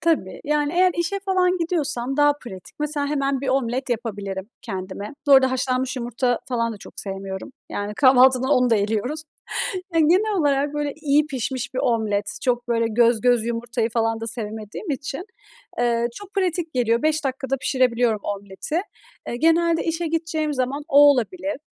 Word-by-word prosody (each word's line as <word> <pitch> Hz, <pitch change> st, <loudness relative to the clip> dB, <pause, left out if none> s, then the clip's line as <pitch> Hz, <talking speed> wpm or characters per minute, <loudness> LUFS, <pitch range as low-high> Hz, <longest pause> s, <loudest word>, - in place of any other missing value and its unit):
Tabii, 315 Hz, -, 0 dB
yani 295 Hz, +1 st, 0 dB
eğer 365 Hz, 0 st, +4 dB
işe 370 Hz, +4 st, -1 dB
falan 370 Hz, -2 st, +1 dB
gidiyorsam 290 Hz, -7 st, -1 dB
daha 290 Hz, 0 st, +5 dB
pratik, 235 Hz, -10 st, -11 dB
mesela 295 Hz, -1 st, -1 dB
hemen 275 Hz, -2 st, 0 dB
bir 270 Hz, -, -3 dB
omlet 260 Hz, 0 st, 0 dB
yapabilirim 205 Hz, -4 st, -4 dB
kendime. 195 Hz, +1 st, -6 dB
Bu 285 Hz, -, +5 dB
arada 265 Hz, -1 st, +7 dB
haşlanmış 255 Hz, 0 st, -1 dB
yumurta 245 Hz, 0 st, 0 dB
falan 230 Hz, -2 st, 0 dB
da -, -, -8 dB
çok -, -, -12 dB
sevmiyorum. 195 Hz, +3 st, -6 dB, 0.2 s
Yani 205 Hz, +1 st, -4 dB
kahvaltıdan 260 Hz, +1 st, +5 dB
onu 250 Hz, -3 st, +4 dB
da 225 Hz, -, +5 dB
eliyoruz. 225 Hz, +9 st, -1 dB, 0.7 s
Yani, 320 Hz, -2 st, +4 dB
genel 400 Hz, +4 st, +3 dB
olarak 285 Hz, 0 st, +1 dB
böyle 295 Hz, -1 st, -1 dB
iyi 300 Hz, -1 st, +2 dB
pişmiş 260 Hz, -2 st, -4 dB
bir -, -, -2 dB
omlet, 215 Hz, -4 st, 0 dB
çok 245 Hz, -1 st, 0 dB
böyle 230 Hz, -1 st, +2 dB
göz 230 Hz, 0 st, +3 dB
göz 245 Hz, -2 st, +3 dB
yumurtayı 235 Hz, 0 st, -2 dB
falan 225 Hz, 0 st, 0 dB
da 225 Hz, -, -4 dB
sevmediğim 220 Hz, -, -5 dB
için, 275 Hz, +5 st, -4 dB, 0.6 s
eee, 235 Hz, -1 st, +2 dB
çok 410 Hz, -1 st, -11 dB
pratik 355 Hz, -5 st, -1 dB
geliyor, 235 Hz, -2 st, +2 dB
5 310 Hz, 0 st, +1 dB
dakikada 270 Hz, 0 st, -1 dB
pişirebiliyorum 245 Hz, -4 st, +1 dB
omleti. 200 Hz, -, -3 dB, 0.5 s
Eee, -, -, -3 dB
genelde 330 Hz, +2 st, +3 dB
işe 330 Hz, 0 st, -1 dB
gideceğim 315 Hz, -2 st, -1 dB
zaman 265 Hz, +3 st, -2 dB
o 280 Hz, -, +3 dB
olabilir 290 Hz, -, -2 dB
260 Hz, 165 wpm, -23 LUFS, 230-300 Hz, 0.7 s, arada